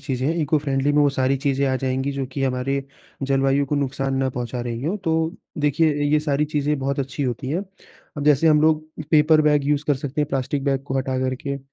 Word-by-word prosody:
चीज़ें 130 -2 -2
हैं। 160 - +1
Eco 150 +1 +2
friendly 140 0 0
में 150 - +4
वो 145 - +4
सारी 135 0 +1
चीज़ें 140 0 0
आ 130 - +1
जाएँगी 130 +1 -1
जो 135 -1 -3
कि 135 +2 -5
हमारे 135 +1 -1 0.4
जलवायु 135 +1 +2
को 145 - -1
नुकसान 135 -1 -1
ना 135 0 +1
पहुँचा 125 0 -4
रही 120 0 -4
हों। 185 +7 0
तो 160 -2 -1 0.2
देखिए, 150 +2 +2 0.2
अ, - - -1
ये 150 - +4
सारी 150 -1 0
चीज़ें 150 -1 -1
बहुत 140 +2 -2
अच्छी 135 +2 -4
होती 130 +1 -3
हैं। 170 +6 0 0.6
अब 145 - -3
जैसे 150 +2 +4
हम 150 -1 +5
लोग 155 0 +3 0.3
पेपर 155 0 +5
बैग 150 -2 +3
यूज़ 145 0 +1
कर 145 - +3
सकते 145 +2 -4
हैं 145 - 0
प्लास्टिक 135 +1 -2
बैग 135 -1 0
को 135 -1 -2
हटा 130 0 -1
करके। 130 +2 -2
140 Hz, 230 wpm, -22 LUFS, 135-150 Hz, 0.6 s, हम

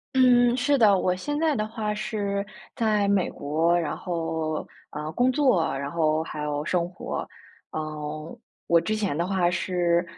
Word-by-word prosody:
嗯， 245 -1 +5
是 280 +3 +2
的， 210 -6 +5
我 180 0 +1
现 290 +10 -3
在 315 -3 +2
的 215 -1 -1
话 215 -1 -3
是 205 -2 -2 0.3
在 215 -3 +2
美 200 -2 +2
国， 165 +4 +1
然 165 - -2
后， 160 -3 -3 0.2
呃， 150 +1 -5
工 250 +8 +2
作， 255 - +3
然 140 +1 -4
后 160 -1 +1
还 155 -2 -6
有 150 +1 -2
生 175 -1 0
活。 180 - -5 0.5
嗯， 155 0 -5 0.3
我 170 -1 +4
之 215 +5 -1
前 205 -8 -1
的 170 +2 -1
话 185 -2 +2
是 175 -1 +1
180 Hz, 175 characters per minute, -26 LUFS, 160-215 Hz, 0.5 s, 嗯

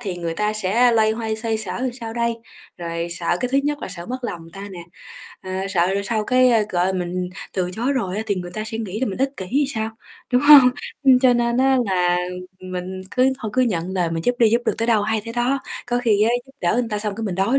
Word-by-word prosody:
thì 195 -6 -4
người 170 -1 -3
ta 210 +3 0
sẽ 215 +4 +3
loay 220 -1 +4
hoay 220 -1 -2
xoay 220 -1 -1
sở 215 0 -2
làm 255 -2 -1
sao 230 -3 -7
đây? 235 0 0 0.4
Rồi 170 0 -3
sợ 170 0 0
cái 250 - 0
thứ 275 - +4
nhất 295 0 0
là - - -6
sợ 175 -2 -7
mất 255 +1 -4
lòng 175 -7 -4
người 165 - -14
ta 200 +1 -8
nè, 180 - -9 0.6
ờ, 185 - -7 0.2
sợ 175 -3 +2
rồi 200 - 0
sau 215 0 -1
cái, 255 +1 +4
ơ, 225 -3 +4
gọi, 180 +1 +1
mình 180 0 -2 0.2
từ 180 -2 -1
chối 240 +8 -1
rồi 195 -8 -2
á 215 - -1
thì 205 - +1
người 180 -2 -5
ta 215 - -3
sẽ 220 +1 -5
nghĩ 215 -1 -4
là 260 - +1
mình 195 - -4
ích 270 +1 +1
kỷ 190 - -5
thì 285 +4 +2
sao, 220 0 -2 0.4
đúng 250 +2 +4
hông? 285 -4 +9 0.3
Ưm, 265 -2 +6
cho 255 -1 +5
nên 235 0 +1
á 265 0 +3
là 180 -2 +2 0.4
mình 185 0 -5
cứ 260 +1 +3
thôi 220 -4 -5
cứ 255 - +4
nhận 185 -7 -1
lời 175 -3 0
mình 165 0 -3
giúp 245 - +2
đi, 230 - +5
giúp 235 +2 +2
được - - +2
tới 230 - 0
đâu 220 -3 +3
hay 215 0 0
tới 230 - -6
đó, 245 +3 +1 0.3
có 245 0 0
khi 220 -4 +2
á 225 - +4 0.2
giúp 270 - -18
đỡ 175 - +2
người 240 -1 0
ta 210 -2 -2
xong 210 -1 -2
cái 225 - -5
mình 195 -4 -2
đói 195 +9 +2
220 Hz, 275 wpm, -21 LUFS, 185-245 Hz, 0.6 s, hông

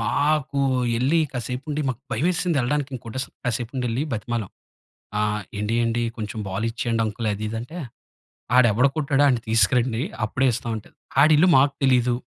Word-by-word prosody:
మాకు 140 +4 +1 0.4
ఎళ్లి 140 +7 +2
కాసేపు 125 +1 -4
ఉండి, 150 +1 -1
మాకు 125 -2 -3
భయమేసింది 175 -1 +1
ఎళ్ళడానికి 140 +2 -1
ఇంకోటేస్ 125 +3 -5 0.2
కాసేపు 120 0 -2
ఉండి 125 -1 -1
ఎళ్లి, 120 +5 -1
బ్రతిమాలం. 115 -1 -3 0.7
ఆహ్, 105 0 0 0.2
"ఎండి, 105 +2 -1
అండి, 115 +1 0
కొంచెం 110 -1 -5
బాలు 100 +4 -2
ఇచ్చేయండి 115 0 -1
అంకుల్ 110 +1 -3
అది, 105 +2 -4
ఇది," 115 - -4
అంటే, 125 +9 -9 0.8
ఆడు 125 - +7
ఎవడు 125 +6 +4
కొట్టాడో 140 -2 +2
వాడిని 125 -5 +2
తీసుకురండి. 115 +2 +2 0.2
అప్పుడే 130 +4 +1
ఇస్తాం 115 +1 -3
అంటే, 110 - -10 0.3
ఆడి 155 +1 +6
ఇల్లు 180 +4 +5
మాకు 140 +1 +4
తెలియదు, 125 -2 +3
125 Hz, 165 wpm, -23 LUFS, 115-140 Hz, 0.8 s, ఆడు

